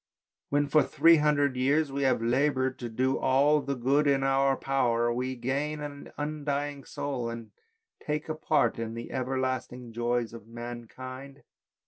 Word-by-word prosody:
When, 145 0 +2
for 150 +2 +5
three 165 0 +5
hundred 145 -3 +2
years, 140 +3 +2
we 140 +1 -2
have 130 -4 +2
laboured 130 +1 +1
to 120 - -5
do 130 +4 0
all 145 +3 +3
the 140 0 -2
good 135 +4 +2
in 135 -1 +3
our 135 0 +3
power 120 -3 +1
we 130 +2 -2
gain 140 +5 -2
an 145 -1 -7
undying 145 -1 -3
soul 130 -5 -3
and 115 -2 -7 0.5
take 150 0 -2
a 155 - -1
part 155 -6 +1
in 115 0 -4
the 115 - -7
ever 130 0 -2
lasting 125 -2 -3
joys 120 0 -1
of 115 -2 -11
mankind. 125 +4 -8
135 Hz, 160 wpm, -28 LUFS, 120-145 Hz, 0.5 s, for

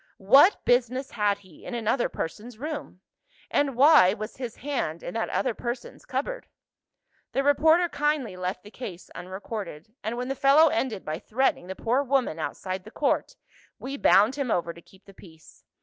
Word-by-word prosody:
What 270 - +5
business 250 +2 +1
had 205 -2 +1
he 185 -5 -18
in 245 - -6
another 235 +2 0
person's 215 +8 -6
room? 290 - -6 0.5
and 280 -3 +1
why 265 - +6
was 215 +1 -7
his 245 -4 -6
hand 245 - -3
in - - -6
that 225 -1 -2
other 255 - 0
person's 240 +2 -6
cupboard? - - -3 0.9
The 275 - +1
reporter 315 +5 +4
kindly 295 - -1
left 185 0 -4
the 210 - -13
case 195 -9 -9
unrecorded; 190 -1 -7
and 220 +3 -3
when 250 +1 -3
the 270 - -1
fellow 280 +4 +5
ended 225 -10 -2
by 155 +1 -3
threatening 240 -6 0
the 190 - -6
poor 245 +7 +1
woman 265 - 0
outside 185 +3 -4
the 215 - -11
court, 300 - -1 0.4
we 275 +2 -6
bound 215 -3 +5
him 275 -4 -2
over 170 -4 0
to 170 - -14
keep 190 +3 -22
the 195 - -15
peace. 160 -4 -17
235 Hz, 175 wpm, -26 LUFS, 190-275 Hz, 0.9 s, why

